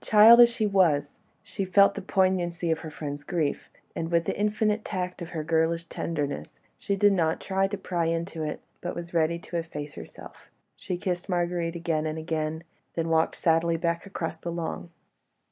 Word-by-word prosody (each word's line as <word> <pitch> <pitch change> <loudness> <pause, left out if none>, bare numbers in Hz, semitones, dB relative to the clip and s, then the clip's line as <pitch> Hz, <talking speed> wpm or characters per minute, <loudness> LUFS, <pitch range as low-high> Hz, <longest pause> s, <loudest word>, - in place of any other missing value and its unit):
Child 220 +2 +8
as 240 - +8
she 230 -2 -1
was, 165 -8 +2 0.2
she 195 - -4
felt 200 +1 +5
the 200 - -5
poignancy 180 -3 +1
of 160 - 0
her 160 - -7
friend's 145 -1 -6
grief, 155 -3 -2 0.3
and 165 - -3
with 170 -1 +2
the - - -1
infinite 210 +1 +1
tact 180 -2 -4
of 170 - -6
her 160 -3 -4
girlish 165 +1 +1
tenderness, 150 -4 -4 0.2
she 200 - -2
did 205 +1 +4
not 165 -4 +1
try 195 0 0
to 205 +1 -4
pry 175 -3 -2
into 165 0 -2
it, 150 -1 -3 0.2
but 175 - -4
was 170 0 -7
ready 165 0 +2
to 170 0 -6
efface 150 -3 -5
herself. - - -12 0.3
She 180 -2 -4
kissed 180 +1 -3
Marguerite 175 -1 -1
again 165 -2 -1
and 155 +1 -3
again, 160 0 -3 0.3
then 165 -1 -1
walked 160 0 +2
sadly 165 0 +2
back 170 +2 -1
across 175 -4 -4
the 170 - -5
lawn. 170 0 -4
170 Hz, 185 wpm, -27 LUFS, 160-185 Hz, 0.3 s, Child